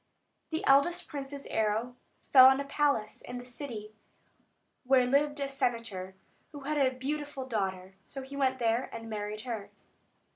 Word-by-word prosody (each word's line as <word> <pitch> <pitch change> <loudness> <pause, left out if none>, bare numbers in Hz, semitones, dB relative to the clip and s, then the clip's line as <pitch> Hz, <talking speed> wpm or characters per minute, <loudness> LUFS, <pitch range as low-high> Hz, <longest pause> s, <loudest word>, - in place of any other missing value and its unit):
The 320 0 -2
eldest 335 +6 +4
prince's 280 -1 -6
arrow 220 +3 0 0.4
fell 260 -2 +11
on 265 +1 +5
a 280 - -2
palace 280 -7 0
in 245 - -7
the 245 - -8
city, 240 -5 -7 0.9
where 255 -1 +4
lived 290 +3 +2
a 280 - -1
senator, 230 -8 -2 0.4
who 290 - -9
had 295 +2 -1
a 260 - +4
beautiful 275 +1 -4
daughter; 190 -5 -3
so 270 +5 -7
he 270 +2 -9
went 260 -2 +1
there, 235 +1 +1
and 225 0 -7
married 210 0 -4
her. 225 -4 -5
255 Hz, 155 wpm, -30 LUFS, 225-280 Hz, 0.9 s, fell